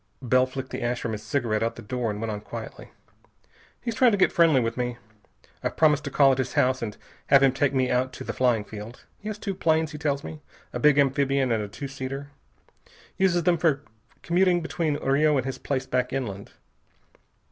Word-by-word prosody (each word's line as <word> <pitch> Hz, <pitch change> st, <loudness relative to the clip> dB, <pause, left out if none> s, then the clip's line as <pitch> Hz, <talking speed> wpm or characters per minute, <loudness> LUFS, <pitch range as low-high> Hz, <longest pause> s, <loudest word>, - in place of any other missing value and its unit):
Bell 130 Hz, +1 st, +3 dB
flicked 130 Hz, 0 st, -7 dB
the -, -, -4 dB
ash 120 Hz, +1 st, -1 dB
from 115 Hz, -, -3 dB
his 105 Hz, -1 st, -4 dB
cigarette 110 Hz, -1 st, -1 dB
out 115 Hz, +1 st, -1 dB
the -, -, -10 dB
door, 120 Hz, +1 st, -2 dB
and 105 Hz, 0 st, -4 dB
went 115 Hz, 0 st, -3 dB
on 105 Hz, -1 st, -5 dB
quietly. -, -, -8 dB, 0.9 s
"He's 235 Hz, -1 st, -3 dB
trying 245 Hz, +2 st, +5 dB
to -, -, +2 dB
get 190 Hz, -, +4 dB
friendly 165 Hz, -5 st, +4 dB
with 115 Hz, -1 st, -1 dB
me. 125 Hz, -1 st, -2 dB, 0.7 s
I've -, -, -3 dB
promised 150 Hz, -3 st, +4 dB
to -, -, -2 dB
call 140 Hz, 0 st, +5 dB
at 130 Hz, -, 0 dB
his 130 Hz, -, -2 dB
house 130 Hz, 0 st, +2 dB
and 105 Hz, -3 st, -5 dB, 0.3 s
have 140 Hz, 0 st, +6 dB
him 135 Hz, -, +5 dB
take 135 Hz, +1 st, +1 dB
me 130 Hz, -2 st, +1 dB
out 130 Hz, +1 st, +1 dB
to -, -, -7 dB
the -, -, -4 dB
flying 120 Hz, -4 st, +2 dB
field. 105 Hz, +3 st, -10 dB
He 210 Hz, -, -9 dB
has 215 Hz, -, -5 dB
two 200 Hz, -2 st, -4 dB
planes, 160 Hz, -3 st, +1 dB
he 150 Hz, -, -8 dB
tells 145 Hz, -2 st, -1 dB
me, 155 Hz, -1 st, -8 dB, 0.3 s
a -, -, -3 dB
big 150 Hz, -1 st, +5 dB
amphibian 135 Hz, -1 st, +2 dB
and 110 Hz, -2 st, +1 dB
a 105 Hz, -, -4 dB
two 140 Hz, +7 st, -7 dB
seater. 135 Hz, +1 st, -6 dB, 0.9 s
Uses 180 Hz, -3 st, +2 dB
them 170 Hz, 0 st, +2 dB
for 150 Hz, -4 st, +1 dB, 0.4 s
commuting 180 Hz, 0 st, +3 dB
between 165 Hz, -2 st, -1 dB
Rio 145 Hz, +2 st, +2 dB
and 130 Hz, -, -1 dB
his 135 Hz, -, -4 dB
place 135 Hz, -2 st, -2 dB
back 125 Hz, 0 st, -1 dB
inland. 100 Hz, -7 st, -4 dB
135 Hz, 215 wpm, -25 LUFS, 125-150 Hz, 0.9 s, have